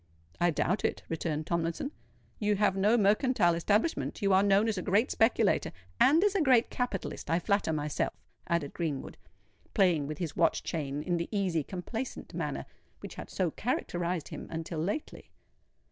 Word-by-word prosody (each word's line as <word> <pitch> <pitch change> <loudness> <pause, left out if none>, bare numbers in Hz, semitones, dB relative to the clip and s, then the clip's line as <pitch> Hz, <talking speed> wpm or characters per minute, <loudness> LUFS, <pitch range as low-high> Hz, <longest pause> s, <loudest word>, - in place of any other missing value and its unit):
"I 175 - +4
doubt 175 +4 0
it," - - -1
returned 155 -1 -2
Tomlinson. 170 - -1 0.5
"You 210 -1 +2
have 200 -1 +2
no 205 +4 +3
mercantile 210 -3 +3
establishment—you 205 - +1
are 190 - +6
known 200 +2 +4
as 220 - 0
a - - -3
great 205 +7 +2
speculator——" 225 -2 +2 0.3
"And 315 +7 +6
as 415 -1 +3
a 390 - +2
great 255 -5 +4
capitalist, 245 -7 -3
I 165 - +3
flatter 200 -1 +1
myself," 150 -1 -1 0.3
added 170 -5 -1
Greenwood, 155 -6 -4 0.6
playing 175 -8 +3
with 155 0 -5
his 170 -3 -4
watch 165 -1 +2
chain 145 -2 -3
in 175 +1 0
the 170 - -3
easy 190 -6 +1
complacent 200 - -6
manner - - -3 0.4
which - - -8
had - - -8
so 180 -4 -1
characterised 175 - -2
him - - -7
until 165 0 -4
lately. 205 - -4
185 Hz, 160 wpm, -30 LUFS, 165-215 Hz, 0.6 s, are